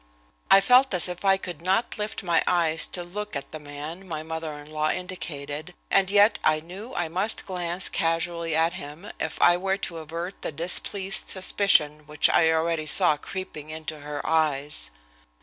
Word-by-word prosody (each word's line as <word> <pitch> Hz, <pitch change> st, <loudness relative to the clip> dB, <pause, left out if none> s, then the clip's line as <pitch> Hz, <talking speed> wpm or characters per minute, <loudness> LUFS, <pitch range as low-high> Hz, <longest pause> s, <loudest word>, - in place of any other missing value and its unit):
I 195 Hz, -, +8 dB
felt 250 Hz, +1 st, +4 dB
as 180 Hz, -, +3 dB
if 180 Hz, +1 st, -7 dB
I 195 Hz, -1 st, +4 dB
could 175 Hz, -5 st, -7 dB
not 190 Hz, +7 st, 0 dB
lift 210 Hz, -1 st, -3 dB
my 170 Hz, -3 st, +2 dB
eyes 165 Hz, -2 st, +1 dB
to 175 Hz, -, -5 dB
look 210 Hz, +2 st, -6 dB
at 140 Hz, 0 st, -6 dB
the 155 Hz, -, -7 dB
man 150 Hz, +5 st, -8 dB
my 155 Hz, -3 st, -5 dB
mother 160 Hz, 0 st, -5 dB
in 145 Hz, +1 st, -13 dB
law 155 Hz, 0 st, 0 dB
indicated, 155 Hz, -3 st, -5 dB, 0.2 s
and 195 Hz, -1 st, +3 dB
yet 205 Hz, +2 st, +4 dB
I 155 Hz, 0 st, +3 dB
knew 190 Hz, +10 st, -10 dB
I 175 Hz, -, -1 dB
must 190 Hz, +7 st, -2 dB
glance 180 Hz, -1 st, -2 dB
casually 165 Hz, 0 st, -1 dB
at 165 Hz, +1 st, +2 dB
him 150 Hz, +8 st, -8 dB
if -, -, -4 dB
I 175 Hz, 0 st, +5 dB
were 195 Hz, +1 st, -1 dB
to 170 Hz, -4 st, -4 dB
avert 170 Hz, +4 st, -7 dB
the -, -, -4 dB
displeased 185 Hz, +5 st, +2 dB
suspicion 155 Hz, -6 st, +2 dB
which 150 Hz, 0 st, +3 dB
I 160 Hz, -, +4 dB
already 160 Hz, -1 st, 0 dB
saw 175 Hz, -2 st, +7 dB
creeping 155 Hz, -1 st, -7 dB
into 155 Hz, 0 st, -6 dB
her 145 Hz, 0 st, -6 dB
eyes. 150 Hz, -, 0 dB
170 Hz, 180 wpm, -25 LUFS, 155-190 Hz, 0.2 s, I